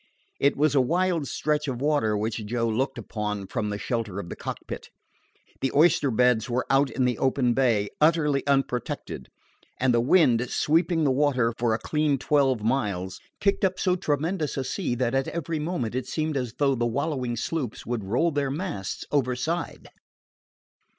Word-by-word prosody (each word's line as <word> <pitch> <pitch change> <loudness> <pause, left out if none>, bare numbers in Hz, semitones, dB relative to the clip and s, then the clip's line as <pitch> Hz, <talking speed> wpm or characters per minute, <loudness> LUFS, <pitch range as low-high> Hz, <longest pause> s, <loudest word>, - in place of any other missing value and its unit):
It 140 +1 +2
was 150 +1 +3
a 140 - +5
wild 170 +2 +1
stretch 150 -1 -1
of 125 -3 -3
water 140 -7 +1
which 110 +1 -2
Joe 115 +1 0
looked 130 +4 -1
upon 105 -2 -4
from 105 +2 -3
the 105 - -3
shelter 110 -3 -3
of 85 - -7
the - - -5
cockpit. - - -7 0.7
The 135 - 0
oyster 150 -2 +4
beds 125 -1 +2
were 125 +1 0
out 135 +1 +4
in 130 - 0
the 125 -2 0
open 130 -2 +2
bay, 115 -6 +2
utterly 150 -3 +3
unprotected, 135 - -1 0.5
and 130 -1 +3
the 120 - +3
wind, 125 -4 +4
sweeping 165 +1 +2
the 140 - +3
water 130 -4 +2
for 115 -2 +1
a - - -1
clean 150 +4 0
twelve 135 -4 +2
miles, 100 -7 -1 0.2
kicked 200 0 +1
up 185 -1 +2
so 180 -2 +2
tremendous 160 -1 -1
a 135 - 0
sea 130 0 -2
that 120 0 0
at 135 0 +1
every 165 -1 -3
moment 150 -8 -2
it 130 0 -3
seemed 155 +2 -2
as 125 -4 -3
though 140 -2 +3
the 120 -2 0
wallowing 130 -1 -2
sloops 130 0 -3
would 120 -3 -2
roll 120 - +1
their 145 -2 0
masts 140 - -4
overside. 145 +5 -1
135 Hz, 175 wpm, -26 LUFS, 120-150 Hz, 0.7 s, a